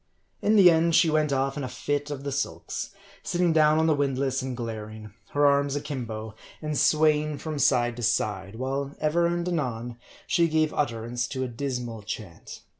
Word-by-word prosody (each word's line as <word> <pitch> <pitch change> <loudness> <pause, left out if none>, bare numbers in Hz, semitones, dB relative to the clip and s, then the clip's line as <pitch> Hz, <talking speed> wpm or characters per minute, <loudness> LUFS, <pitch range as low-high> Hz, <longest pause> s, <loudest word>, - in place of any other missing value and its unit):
In 215 - +3
the 185 -4 +8
end 165 0 +3
she 170 -2 +5
went 155 -1 +2
off 135 +1 0
in 145 - -3
a - - -2
fit 145 +3 -2
of 140 -2 -5
the 140 - -3
sulks; 135 +1 -3 0.3
sitting 175 -2 +1
down 155 -1 +5
on 160 - +3
the 160 - +4
windlass 135 -2 0
and 130 -1 -4
glaring; 110 -2 -6 0.2
her 145 0 +3
arms 140 0 +3
akimbo, 115 -7 -5 0.3
and 150 -1 -3
sway 155 +1 +4
ing 150 -1 -4
from 155 -1 -5
side 120 -3 +2
to - - -5
side; 105 -3 -1
while 135 +3 -3
ever 165 +3 +2
and 175 0 -1
anon 120 -8 -3 0.3
she 170 -1 +3
gave 155 -1 +1
utter 115 -6 -1
ance 120 0 -2
to 130 -2 -3
a - - -2
dismal 120 -2 -4
chant. 100 -4 -8
140 Hz, 190 wpm, -26 LUFS, 120-155 Hz, 0.3 s, the